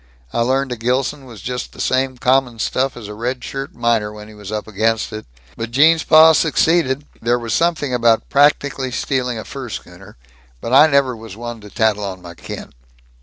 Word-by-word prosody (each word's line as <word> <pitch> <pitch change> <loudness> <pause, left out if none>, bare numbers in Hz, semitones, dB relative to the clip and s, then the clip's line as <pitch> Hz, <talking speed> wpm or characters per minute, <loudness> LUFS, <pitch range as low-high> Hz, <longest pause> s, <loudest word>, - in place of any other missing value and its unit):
I - - 0
learned 130 +2 +1
a 125 - -3
Gilson 130 +4 -1
was 115 -6 -12
just 125 0 -4
the - - -15
same 130 0 0
common 125 -1 +2
stuff 130 +4 -1
as 110 -4 -8
a 105 - -7
red 125 +4 -4
shirt 135 0 -6
miner, 115 -3 +1
when 105 0 -11
he - - -13
was 105 -1 -9
up 105 0 -4
against 110 +1 0
it. 110 -7 -7 0.3
But 115 0 -5
Gene's 160 +6 +4
pa 160 0 +7
succeeded 155 -3 +2 0.2
there 120 +2 +2
was 115 -2 -4
something 165 -6 +1
about 115 -2 +2
practically 140 -2 +2
stealing 125 -1 -2
a 110 - -6
fur 135 -3 -7
schooner 95 0 -10 0.4
but 115 - -4
I 145 +4 +8
never 140 -4 +2
was 110 -3 -11
one 120 -1 -7
to 105 - -12
tattle 105 -1 +1
on 95 -2 -5
my 85 -1 -11
kin. 85 - -9
120 Hz, 200 wpm, -19 LUFS, 110-135 Hz, 0.4 s, I